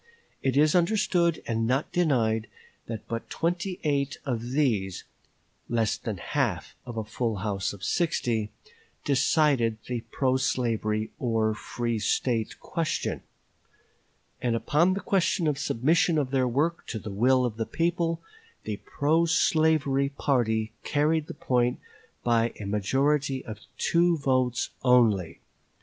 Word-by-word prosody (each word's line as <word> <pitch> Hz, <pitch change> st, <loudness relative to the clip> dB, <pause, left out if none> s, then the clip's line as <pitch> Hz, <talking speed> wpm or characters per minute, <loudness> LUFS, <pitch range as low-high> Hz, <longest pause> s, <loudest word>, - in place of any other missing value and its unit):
It 135 Hz, 0 st, 0 dB
is 150 Hz, +1 st, +5 dB
understood, 175 Hz, -2 st, +2 dB
and 115 Hz, -1 st, -1 dB
not 130 Hz, +4 st, 0 dB
denied, 115 Hz, -10 st, +1 dB, 0.4 s
that 110 Hz, -2 st, -6 dB
but 115 Hz, 0 st, -5 dB
twenty 175 Hz, +2 st, -2 dB
eight 140 Hz, -2 st, 0 dB
of 120 Hz, -5 st, -1 dB
these 115 Hz, -, 0 dB, 0.7 s
less 115 Hz, -3 st, +1 dB
than -, -, -5 dB
half -, -, -2 dB
of 120 Hz, -2 st, -6 dB
a 110 Hz, -, -1 dB
full 110 Hz, +1 st, -2 dB
house 100 Hz, -2 st, -1 dB
of 100 Hz, -2 st, -11 dB
sixty 120 Hz, -, 0 dB, 0.6 s
decided 140 Hz, -5 st, +2 dB
the 125 Hz, -2 st, -3 dB
pro 130 Hz, -1 st, +1 dB
slavery 110 Hz, -4 st, -1 dB
or 110 Hz, -3 st, +1 dB
free 115 Hz, +1 st, -3 dB
State 115 Hz, 0 st, 0 dB
question; 165 Hz, -2 st, -2 dB, 1.2 s
and 120 Hz, -2 st, +1 dB
upon 170 Hz, +10 st, +2 dB
the 200 Hz, -, -3 dB
question 185 Hz, -2 st, +1 dB
of 150 Hz, -2 st, 0 dB
submission 155 Hz, +5 st, +2 dB
of 140 Hz, -4 st, 0 dB
their 130 Hz, -2 st, +2 dB
work 150 Hz, +7 st, 0 dB
to 115 Hz, -, -4 dB
the 105 Hz, -1 st, -6 dB
will 125 Hz, +5 st, +3 dB
of 115 Hz, -3 st, -3 dB
the 115 Hz, -, -2 dB
people, 165 Hz, -1 st, -1 dB, 0.4 s
the -, -, -4 dB
pro 160 Hz, +3 st, +1 dB
slavery 155 Hz, -4 st, +2 dB
party 115 Hz, -6 st, 0 dB
carried 150 Hz, +1 st, +1 dB
the -, -, -7 dB
point 125 Hz, -1 st, +1 dB, 0.4 s
by 115 Hz, -1 st, +2 dB
a 105 Hz, -, -5 dB
majority 135 Hz, +7 st, 0 dB
of 110 Hz, -2 st, -7 dB, 0.2 s
two 170 Hz, 0 st, +3 dB
votes 130 Hz, -3 st, 0 dB
only. 115 Hz, -9 st, +3 dB
130 Hz, 135 wpm, -27 LUFS, 115-155 Hz, 1.2 s, is